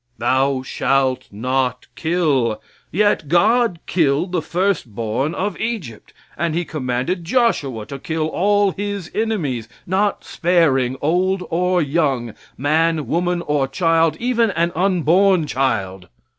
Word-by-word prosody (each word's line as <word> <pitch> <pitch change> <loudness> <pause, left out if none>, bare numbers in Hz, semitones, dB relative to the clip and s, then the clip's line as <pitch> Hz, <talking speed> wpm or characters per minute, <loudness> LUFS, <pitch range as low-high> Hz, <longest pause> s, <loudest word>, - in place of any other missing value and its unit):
Thou 130 +3 +1
shalt 130 0 0
not 125 +3 -1
kill, 150 -10 +1 0.3
yet 205 -4 +1
God 215 - +3
killed 160 +1 +1
the 180 -3 0
first 180 - -1
born 120 +8 -2
of 200 -1 -3
Egypt, 210 - -5 0.2
and 165 -2 -1
he 175 +1 -1
commanded 145 +5 -2
Joshua 165 - 0
to 140 +2 -8
kill 160 +2 -2
all 200 +4 +2
His 200 -1 -5
enemies, 155 - -2 0.2
not 195 +3 0
sparing 140 -8 +1
old 180 +4 +1
or 180 +1 +2
young, 135 -6 0 0.2
man, 155 +2 +1
woman 175 +1 -1
or 145 -3 0
child, 165 +2 +2
even 235 -2 +1
an 170 -2 0
unborn 185 0 +3
child. 100 -10 -2
165 Hz, 125 wpm, -20 LUFS, 135-185 Hz, 0.3 s, God